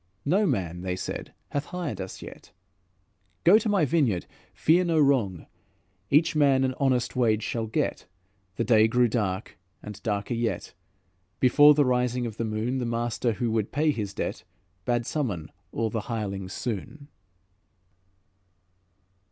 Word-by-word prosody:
'No 195 +8 +3
man,' 90 - -2
they 90 0 -2
said, 90 - -5 0.2
'hath 145 0 -2
hired 165 - -4
us 95 - -7
yet.' - - -12 0.9
'Go 200 +6 +7
to 220 - -2
my 195 -6 +3
vineyard, 130 - +1 0.3
fear 170 +4 +3
no 165 -3 +1
wrong; 125 - +2 0.6
Each 160 +3 +3
man 140 -3 +4
an 130 0 +1
honest 130 -3 +1
wage 110 -4 +2
shall 115 -1 -2
get.' 110 - -2 0.5
The - - 0
day 110 -2 +5
grew 125 +2 +3
dark 105 -7 -2 0.2
and 105 -1 -9
darker 105 0 -2
yet, 115 -5 -2 0.7
"Before 145 +4 +7
the 145 -1 +4
rising 125 -1 +1
of 110 -2 -6
the 115 - -1
moon; 110 +4 -2
The 125 - -2
master 120 0 -1
who 120 +1 -2
would 110 -2 -1
pay 150 +2 +2
his 105 -7 -3
debt, - - -3 0.4
Bade 120 -1 0
summon 100 - -3 0.2
all 115 -1 -1
the 110 - -2
hirelings 100 -5 -4
soon." 125 +8 -5
120 Hz, 150 wpm, -26 LUFS, 105-140 Hz, 0.9 s, Go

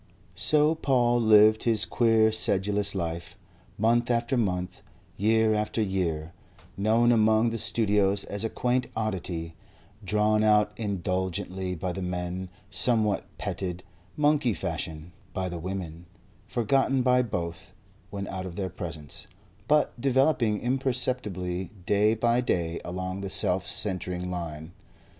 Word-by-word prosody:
So 150 +1 +3
Paul 120 -6 +2
lived 110 0 +6
his 110 -2 +3
queer 115 -2 +3
sedulous 100 -1 0
life, 85 -2 -4 0.4
month 120 +3 +2
after 120 +1 +1
month, 90 -6 -1 0.3
year 110 +1 +3
after 105 +1 -1
year, 85 -6 -1 0.4
known 110 +4 +3
among 110 0 +3
the 115 - -3
studios 100 -3 +2
as 100 +1 -5
a 115 - -1
quaint 125 +2 0
oddity, 90 -6 -3 0.5
drawn 105 +2 +2
out 105 -1 +4
indulgently 95 -2 -2
by 90 +2 -3
the 95 +2 -5
men, 90 0 -4 0.2
somewhat 110 -5 +2
petted, 90 -1 -4 0.3
monkey 145 -6 +2
fashion, 80 -2 -5 0.2
by 95 -1 -1
the 85 -1 -5
women, 90 -2 -6 0.4
forgotten 130 +2 +1
by 125 0 +4
both 85 -8 -4 0.4
when 100 0 -5
out 95 -1 -5
of 85 - -8
their 95 -1 -3
presence, 80 -5 -8 0.4
but 150 -4 +2
developing 130 -5 +2
imperceptibly 120 -8 -1 0.2
day 105 +3 +3
by 120 +2 +2
day 85 -8 -1
along 95 +2 -4
the 100 - -4
self 90 -1 +2
centring 90 -2 -2
line. 80 -2 -6
100 Hz, 125 wpm, -27 LUFS, 90-115 Hz, 0.5 s, lived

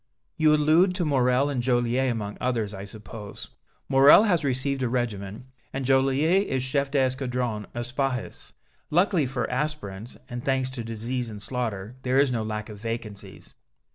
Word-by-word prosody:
"You 155 -1 +4
allude 160 +5 +4
to 180 -3 0
Morrel 130 -1 +2
and 140 -4 -1
Joliette 120 +1 +1
among 105 -3 -4
others, 115 -5 -1
I 95 0 -7
suppose. 105 0 -9 0.4
Morrel 135 +8 +7
has 180 -7 +2
received 135 0 0
a 125 - 0
regiment, 110 -3 -3 0.3
and 135 -1 -3
Joliette 135 +9 +3
is 130 -1 -1
Chef 140 +1 0
d'Escadron 125 -5 -1
of 120 0 -2
Spahis. 130 -1 -3 0.4
Luckily 175 -3 +2
for 125 -2 -2
aspirants, 125 -7 -4
and 120 -1 -6
thanks 130 -1 0
to 125 -3 -5
disease 115 +2 -3
and 105 -2 -8
slaughter, 115 -1 -4
there 130 0 +1
is 140 -1 +4
no 115 -2 -1
lack 105 0 -4
of 105 -2 -10
vacancies." 115 -3 -7
125 Hz, 160 wpm, -26 LUFS, 115-140 Hz, 0.4 s, Morrel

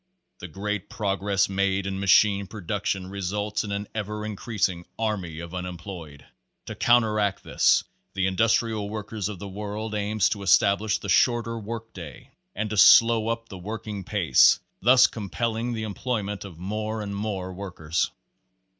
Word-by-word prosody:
The 90 - -7
great 100 +4 -4
progress 100 -1 0
made 100 0 0
in 95 0 -3
machine 100 +1 +4
production 100 -1 -3
re 100 +2 -7
sults 105 +3 -2
in 105 - -6
an 100 0 -3
ever 105 0 -4
increasing 100 -5 -2
army 95 -8 -2
of 85 +1 -8
unemployed. 90 -4 -7 0.4
To - - -6
counteract 105 -4 +2
this - - +3 0.3
the 95 -1 +1
Industrial 110 +1 +1
Workers 105 -1 -4
of 105 - -6
the 100 - -7
World 105 +2 -5
aims 105 -1 +1
to 105 - -3
establish 100 +2 +3
the - - -8
shorter 115 +4 +2
work 115 +1 -7
day, 80 -8 -10 0.2
and 110 +2 -2
to 105 - -2
slow 115 +1 +7
up 115 0 -3
the 95 - -8
working 105 +1 -6
pace, 90 - +4 0.2
thus 125 +5 +7
compelling 115 +3 -2
the 110 -1 -3
employment 105 -2 -3
of 90 -5 -10
more 105 +4 -3
and 100 -1 -5
more 100 -3 -3
workers. 85 -4 -2
100 Hz, 155 wpm, -25 LUFS, 95-110 Hz, 0.4 s, slow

